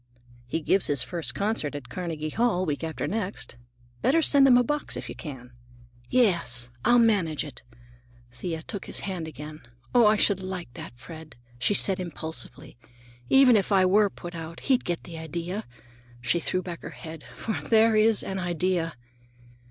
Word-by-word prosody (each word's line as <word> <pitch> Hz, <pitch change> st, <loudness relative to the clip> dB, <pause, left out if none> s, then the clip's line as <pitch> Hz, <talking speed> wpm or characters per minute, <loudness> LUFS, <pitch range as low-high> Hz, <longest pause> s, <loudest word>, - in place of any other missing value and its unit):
"He 165 Hz, +6 st, -2 dB
gives 190 Hz, +5 st, +3 dB
his 140 Hz, -3 st, +2 dB
first 170 Hz, -3 st, 0 dB
concert 200 Hz, -8 st, -1 dB
at 140 Hz, -3 st, -7 dB
Carnegie 160 Hz, -3 st, -4 dB
Hall, 215 Hz, -4 st, +1 dB
week 150 Hz, -1 st, -3 dB
after 160 Hz, -1 st, -3 dB
next. 195 Hz, -, -4 dB, 0.4 s
Better 320 Hz, -, +3 dB
send 280 Hz, -2 st, +6 dB
him 250 Hz, -2 st, +7 dB
a 245 Hz, -, +4 dB
box 295 Hz, +4 st, -2 dB
if -, -, -6 dB
you -, -, -5 dB
can." 130 Hz, -6 st, -9 dB, 0.6 s
"Yes, 170 Hz, -, +2 dB
I'll 245 Hz, -, +5 dB
manage 200 Hz, -10 st, +2 dB
it." 145 Hz, -, -10 dB, 0.7 s
Thea 160 Hz, +6 st, -5 dB
took 200 Hz, +2 st, -6 dB
his -, -, -2 dB
hand 180 Hz, -5 st, -4 dB
again. 150 Hz, +1 st, -8 dB, 0.3 s
"Oh, 240 Hz, -3 st, +6 dB
I 210 Hz, -, +5 dB
should 200 Hz, -2 st, +2 dB
like 185 Hz, -9 st, -6 dB
that, 120 Hz, -, -9 dB
Fred!" 160 Hz, +4 st, -11 dB, 0.2 s
she 200 Hz, -, +3 dB
added 190 Hz, -2 st, +3 dB
impulsively. 160 Hz, -9 st, -8 dB, 0.5 s
"Even 265 Hz, -3 st, +7 dB
if 205 Hz, 0 st, +1 dB
I 190 Hz, -2 st, +5 dB
were 205 Hz, +2 st, +4 dB
put 175 Hz, -1 st, -9 dB
out, 165 Hz, 0 st, -8 dB
he'd 260 Hz, -3 st, +1 dB
get 175 Hz, -1 st, -2 dB
the 165 Hz, -2 st, -8 dB
idea,"—she 125 Hz, -, -5 dB
threw 185 Hz, +2 st, -1 dB
back 175 Hz, -2 st, -7 dB
her -, -, -7 dB
head,—"for 160 Hz, -, -6 dB
there 225 Hz, 0 st, +5 dB
is 215 Hz, 0 st, +4 dB
an 190 Hz, 0 st, -4 dB
idea!" 175 Hz, -1 st, -1 dB
175 Hz, 170 wpm, -26 LUFS, 150-205 Hz, 0.7 s, him